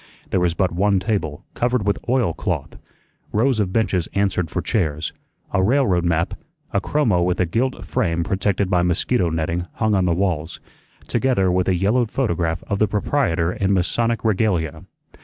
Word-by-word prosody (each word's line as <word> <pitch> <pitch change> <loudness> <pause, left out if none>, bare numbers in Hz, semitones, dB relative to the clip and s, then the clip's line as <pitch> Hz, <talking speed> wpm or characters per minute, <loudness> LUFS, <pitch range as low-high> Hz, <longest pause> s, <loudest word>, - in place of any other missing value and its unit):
There 95 - +2
was 90 -2 +1
but 95 -1 +1
one 100 +3 +2
table, 90 -8 -2
covered 120 -3 0
with 100 - 0
oilcloth; 120 -10 -1 0.6
rows 120 +2 +2
of 95 -3 0
benches 95 -5 +1
answered 95 -4 +1
for - - -3
chairs; 80 -8 -1 0.4
a 95 - +3
railroad 100 -5 +2
map, 85 -1 +1 0.4
a - - +2
chromo 115 -12 +1
with 90 +1 0
a 90 - +3
gilt 115 +4 -1
frame 85 +1 0
protected 100 +1 0
by 90 -2 +2
mosquito 90 +2 +1
netting, 80 +2 -2
hung 110 -1 0
on 95 -2 +2
the 85 -2 +2
walls, 85 -4 -1 0.5
together 100 -9 +2
with 90 0 +1
a 95 - +3
yellowed 105 +6 +1
photograph 85 -11 -1
of 100 -1 -1
the 110 - +3
proprietor 100 - 0
in 100 0 0
Masonic 115 +6 0
regalia. 90 -8 0
95 Hz, 165 wpm, -21 LUFS, 85-110 Hz, 0.6 s, a